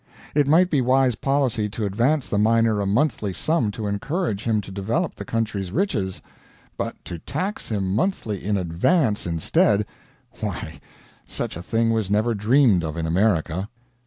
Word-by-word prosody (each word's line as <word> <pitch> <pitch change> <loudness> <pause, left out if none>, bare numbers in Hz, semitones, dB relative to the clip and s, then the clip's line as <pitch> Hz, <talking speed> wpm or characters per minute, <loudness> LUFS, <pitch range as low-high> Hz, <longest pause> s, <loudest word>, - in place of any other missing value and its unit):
It 145 -1 +3
might 175 +5 +4
be 145 -4 +3
wise 130 0 +3
policy 125 -4 0
to 110 +1 -3
advance 120 +9 +1
the 100 - 0
miner 115 0 +3
a 100 - -1
monthly 110 -3 +1
sum 155 - +1
to 110 - -5
encourage 105 - -2
him 110 -2 +2
to 95 - -10
develop 110 - -1
the - - -8
country's 105 -5 -2
riches; 105 - -1 0.5
but - - -3
to 85 - -6
tax 185 - -4
him 95 -4 -1
monthly 110 - -1
in 100 0 0
advance 105 - +1
instead 85 +5 +2 0.5
why, - - -5 0.5
such - - -4
a 85 - -6
thing 115 +5 +1
was 110 -4 -1
never 110 +3 +2
dreamed 110 - +3
of 80 0 -4
in 80 - -2
America. 90 +1 +1
110 Hz, 160 wpm, -23 LUFS, 100-130 Hz, 0.5 s, might